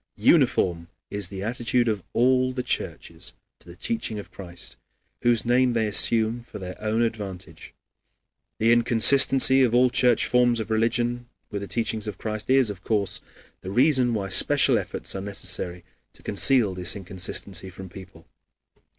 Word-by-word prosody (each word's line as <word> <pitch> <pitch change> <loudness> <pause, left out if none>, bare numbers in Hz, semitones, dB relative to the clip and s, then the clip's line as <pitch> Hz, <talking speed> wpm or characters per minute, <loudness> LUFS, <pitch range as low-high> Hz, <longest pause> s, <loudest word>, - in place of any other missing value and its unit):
Uniform 85 -2 +2 0.2
is 100 -2 -3
the 95 -1 -7
attitude 120 +2 -1
of 105 -3 -1
all 130 +1 +2
the 125 -1 -4
churches - - -5 0.3
to - - -17
the 85 - -12
teaching 225 - -3
of 105 - -9
Christ, 85 -3 -10 0.5
whose 120 -1 +1
name 125 +1 +2
they 115 -1 0
assume 110 +2 +2
for 120 - -11
their 90 -2 -7
own 110 +2 0
advantage. 95 -7 -7 0.8
The 115 +1 +2
inconsistency 130 +3 +5
of 120 -2 +2
all 125 0 +4
church 125 -2 +3
forms 125 -1 +2
of 110 0 -5
religion 120 +2 -1 0.2
with 100 -2 -4
the 100 - -6
teaching 110 -1 -2
of 105 - -6
Christ 110 0 -5
is, 130 -4 +3
of 95 -2 -11
course, 105 -3 -2 0.4
the 95 - -8
reason 125 +1 +2
why 100 -2 -3
special 95 - +4
efforts - - -7
are 95 - -5
necessary 90 -3 -5 0.3
to - - -20
conceal 110 -1 +2
this 90 +3 -1
inconsistency 95 0 -2
from 95 +1 -10
people. 95 0 -14
110 Hz, 160 wpm, -24 LUFS, 95-120 Hz, 0.8 s, inconsistency